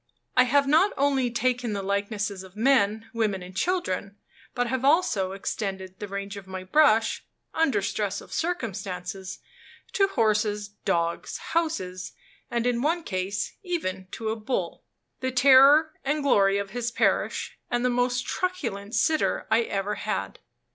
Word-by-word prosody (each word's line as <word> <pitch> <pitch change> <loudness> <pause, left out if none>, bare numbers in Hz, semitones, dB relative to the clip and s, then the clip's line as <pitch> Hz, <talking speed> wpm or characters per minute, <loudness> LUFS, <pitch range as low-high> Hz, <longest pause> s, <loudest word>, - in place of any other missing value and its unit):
I 255 - +6
have 280 +3 +3
not 315 +8 +4
only 270 -3 +2
taken 245 -1 0
the 200 -1 -3
likenesses 200 0 -2
of 190 0 -13
men, 220 -2 +2
women, 210 -5 -1
and 180 +1 -11
children, 200 - -1 0.4
but 245 -1 +1
have 255 +1 -2
also 270 - +2
extended 190 -1 -4
the 205 - -5
range 200 +1 -5
of 195 -2 -10
my 190 0 -6
brush, 225 0 +3 0.3
under 270 -11 +2
stress 200 0 -2
of - - -12
circumstances, 195 - -4 0.5
to 390 - +3
horses, 215 - +1 0.2
dogs, 170 0 -1 0.2
houses, 190 - -2 0.4
and 235 0 -1
in 245 -1 +1
one 330 +4 0
case 190 -2 -3
even 190 - -3
to 220 -1 -3
a 220 - -1
bull 225 +3 -3 0.4
the 260 - -1
terror 275 +4 +6
and 295 +2 0
glory 200 -7 +4
of 200 -1 -4
his 240 +1 -2
parish, 240 - 0
and 240 +1 0
the 250 - +3
most 245 0 0
truculent 235 - -3
sitter 315 -1 +1
I 225 +1 +5
ever 200 -2 -2
had. - - -3
225 Hz, 150 wpm, -26 LUFS, 195-270 Hz, 0.5 s, I